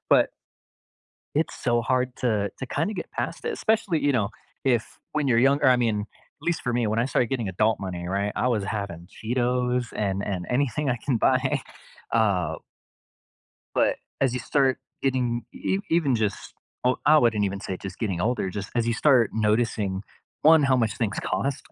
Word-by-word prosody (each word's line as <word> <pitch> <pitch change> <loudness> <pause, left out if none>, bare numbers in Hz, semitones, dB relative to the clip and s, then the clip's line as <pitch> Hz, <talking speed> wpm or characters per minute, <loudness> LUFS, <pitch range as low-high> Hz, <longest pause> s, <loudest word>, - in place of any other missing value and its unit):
But - - +6 1.1
It's 155 +2 0
so 120 -1 +2
hard 125 +1 0
to 105 -5 0
to 130 - -4
kind 160 - -1
of 215 - -6
get 175 - -5
past - - -4
it, 465 - 0
especially, 215 - +1
you 145 - +4
know, 110 -6 +1 0.4
if 120 -4 0
when 150 -3 0
you're 115 - +4
younger 135 +3 +4
I 130 -1 +6
mean, 115 -4 +1
at 105 - -18
least 170 -2 0
for 125 - -1
me, 120 -2 +1
when 110 +1 0
I 120 - +2
started 125 -3 +1
getting 120 -6 -2
adult 110 +4 +1
money, 90 -2 -4
right, 100 +2 -1
I 125 - +1
was 110 -5 0
having 95 -5 -4
Cheetos 125 +2 0
and 100 -2 -1
and 90 -3 -3
anything 140 +2 +1
I 125 - +1
can 135 -4 +1
buy, 130 +3 +2 0.5
uh 100 -7 +2 1.2
but - - +3 0.2
as 135 -3 +2
you 125 - -2
start 135 +1 +2 0.2
getting 125 -3 0
ev 190 - -1
even 160 -6 +3
just, 110 -3 -2 0.3
o 125 0 +3
I 155 +1 +7
wouldn't 115 -6 +3
even 100 0 -2
say 95 -2 -4
just 95 0 -8
getting 95 -6 -2
older, 110 -3 0
just 100 0 -5
as 120 -1 +1
you 115 - +1
start 125 -3 +4
noticing, 105 -3 0 0.4
1, 160 0 +7
how 135 -2 +4
much 115 -3 0
things 105 -4 -1
cost, 140 0 -2
120 Hz, 190 wpm, -25 LUFS, 105-130 Hz, 1.2 s, I